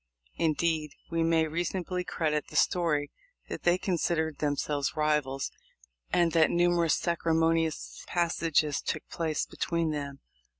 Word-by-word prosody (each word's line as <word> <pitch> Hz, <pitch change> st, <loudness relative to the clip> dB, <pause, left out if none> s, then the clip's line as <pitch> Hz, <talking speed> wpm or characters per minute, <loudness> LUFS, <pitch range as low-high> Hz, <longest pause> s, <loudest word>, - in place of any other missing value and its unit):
Indeed, 160 Hz, -1 st, +1 dB, 0.2 s
we 165 Hz, 0 st, +1 dB
may 165 Hz, -1 st, +3 dB
reasonably 175 Hz, +3 st, -2 dB
credit 155 Hz, -4 st, -1 dB
the -, -, -12 dB
story 155 Hz, -5 st, +2 dB, 0.4 s
that -, -, -5 dB
they 175 Hz, +1 st, +3 dB
com 185 Hz, -1 st, -1 dB
sidered 160 Hz, -2 st, 0 dB
themselves 145 Hz, 0 st, -1 dB
rivals, 150 Hz, -3 st, 0 dB, 0.6 s
and 170 Hz, -1 st, +3 dB
that 160 Hz, -1 st, +4 dB
numerous 175 Hz, -2 st, +3 dB
sacri* 170 Hz, -1 st, 0 dB
monious 165 Hz, -1 st, 0 dB
passages 165 Hz, -3 st, +1 dB
took 155 Hz, -, -3 dB
place 160 Hz, -3 st, -1 dB
between 170 Hz, -2 st, -1 dB
them. 140 Hz, -2 st, -5 dB
160 Hz, 130 wpm, -29 LUFS, 150-170 Hz, 0.6 s, that